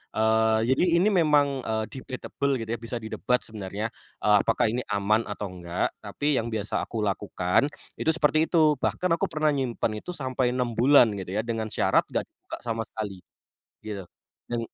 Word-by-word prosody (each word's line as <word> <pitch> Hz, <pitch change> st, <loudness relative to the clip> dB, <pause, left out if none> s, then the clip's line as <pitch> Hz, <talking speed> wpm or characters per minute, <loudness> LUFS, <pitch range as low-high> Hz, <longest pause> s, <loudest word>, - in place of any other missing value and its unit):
Eee, 110 Hz, 0 st, +3 dB
jadi 130 Hz, -, +2 dB, 0.2 s
ini 195 Hz, -, +3 dB, 0.2 s
memang, 150 Hz, -2 st, +4 dB, 0.2 s
eee, 110 Hz, -1 st, -1 dB
debatable 135 Hz, +1 st, -4 dB
gitu 115 Hz, -1 st, -6 dB
ya -, -, -10 dB
bisa 115 Hz, +2 st, -2 dB
didebat 125 Hz, +3 st, 0 dB
sebenarnya. 105 Hz, 0 st, -2 dB, 0.4 s
Eee, 105 Hz, -1 st, +5 dB
apakah 115 Hz, 0 st, +1 dB
ini 125 Hz, +1 st, -2 dB
aman 105 Hz, +2 st, +1 dB
atau 105 Hz, 0 st, -4 dB
nggak, 90 Hz, -1 st, -3 dB
tapi 145 Hz, -1 st, -1 dB
yang 115 Hz, -, -3 dB
biasa 105 Hz, -2 st, -1 dB
aku 115 Hz, -, -5 dB
lakukan, 100 Hz, +3 st, 0 dB, 0.3 s
itu 160 Hz, -, +2 dB
seperti 155 Hz, 0 st, +3 dB
itu. 155 Hz, -3 st, +4 dB
Bahkan 180 Hz, -, 0 dB
aku -, -, -1 dB
pernah 155 Hz, 0 st, +1 dB
nyimpen 125 Hz, -4 st, -1 dB
itu 180 Hz, -, -7 dB
sampai 130 Hz, -4 st, 0 dB
6 125 Hz, -2 st, -1 dB
bulan 130 Hz, +1 st, +6 dB
gitu 95 Hz, -1 st, -7 dB
ya, 110 Hz, -, +1 dB
dengan 115 Hz, -1 st, -3 dB
syarat -, -, +3 dB
nggak -, -, -1 dB
dibuka -, -, -10 dB
sama 115 Hz, -1 st, -2 dB
sekali. 100 Hz, -4 st, -6 dB, 0.7 s
Gitu, 105 Hz, -2 st, -5 dB, 0.5 s
dan 120 Hz, -, -1 dB
115 Hz, 175 wpm, -26 LUFS, 105-135 Hz, 0.7 s, bulan